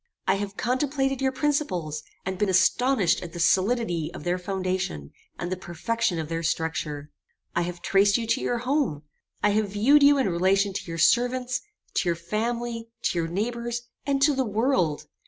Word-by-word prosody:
I 190 Hz, -, +5 dB
have 200 Hz, 0 st, -5 dB
contemplated 270 Hz, +1 st, 0 dB
your 265 Hz, 0 st, +2 dB
principles, 190 Hz, -, -1 dB, 0.2 s
and 190 Hz, 0 st, -3 dB
been 210 Hz, -, +2 dB
astonished 190 Hz, +3 st, +3 dB
at 175 Hz, -1 st, -8 dB
the 175 Hz, -, -6 dB
solidity 185 Hz, -2 st, +2 dB
of -, -, -8 dB
their 175 Hz, +2 st, 0 dB
foundation, 185 Hz, -, -3 dB, 0.3 s
and 175 Hz, +1 st, -4 dB
the -, -, 0 dB
perfection 185 Hz, +3 st, -2 dB
of 160 Hz, -1 st, -3 dB
their 165 Hz, +1 st, -3 dB
structure. 160 Hz, -3 st, -2 dB, 0.4 s
I 170 Hz, -, +2 dB
have 175 Hz, 0 st, -5 dB
traced 200 Hz, +1 st, +4 dB
you 235 Hz, -, -3 dB
to 230 Hz, +1 st, 0 dB
your 245 Hz, -, 0 dB
home. 250 Hz, -, 0 dB, 0.4 s
I 210 Hz, -, +5 dB
have 210 Hz, 0 st, +1 dB
viewed 270 Hz, +9 st, +5 dB
you 285 Hz, 0 st, +7 dB
in 265 Hz, -, +2 dB
relation 190 Hz, +3 st, +2 dB
to -, -, -4 dB
your 165 Hz, -1 st, -5 dB
servants, 250 Hz, +6 st, +2 dB, 0.3 s
to 175 Hz, -, +1 dB
your 170 Hz, -, +1 dB
family, 230 Hz, +6 st, -3 dB
to 175 Hz, -, +1 dB
your 165 Hz, -, -1 dB
neighbours, 235 Hz, +6 st, -3 dB, 0.2 s
and 280 Hz, -1 st, 0 dB
to 295 Hz, 0 st, +5 dB
the 265 Hz, -1 st, +1 dB
world. 215 Hz, -, 0 dB
200 Hz, 180 wpm, -26 LUFS, 175-245 Hz, 0.4 s, you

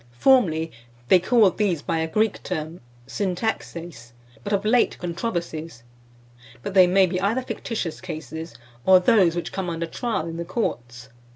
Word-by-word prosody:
Formerly, 165 Hz, -, +3 dB, 0.4 s
they 185 Hz, -, +7 dB
called 210 Hz, +1 st, +3 dB
these 185 Hz, -8 st, +1 dB
by 165 Hz, -, -1 dB
a 160 Hz, -, -1 dB
Greek 215 Hz, +5 st, 0 dB
term, 160 Hz, -1 st, -5 dB, 0.2 s
syntaxeis, 175 Hz, -, -4 dB, 0.3 s
but 205 Hz, -, -5 dB
of 200 Hz, 0 st, 0 dB
late 240 Hz, +2 st, +3 dB
"controversies;" 170 Hz, -, -4 dB, 0.8 s
but 200 Hz, -, -4 dB
they 185 Hz, -2 st, +7 dB
may 190 Hz, +1 st, +5 dB
be 180 Hz, 0 st, -2 dB
either 230 Hz, +6 st, 0 dB
fictitious 220 Hz, -9 st, -4 dB
cases, 160 Hz, -3 st, -7 dB, 0.3 s
or 185 Hz, +4 st, +7 dB
those 180 Hz, -3 st, +4 dB
which 175 Hz, -, -4 dB
come 190 Hz, -2 st, -3 dB
under 165 Hz, 0 st, -3 dB
trial 220 Hz, -1 st, -3 dB
in 165 Hz, 0 st, -6 dB
the 170 Hz, -, -3 dB
courts. 120 Hz, -, -4 dB
180 Hz, 155 wpm, -24 LUFS, 160-205 Hz, 0.8 s, they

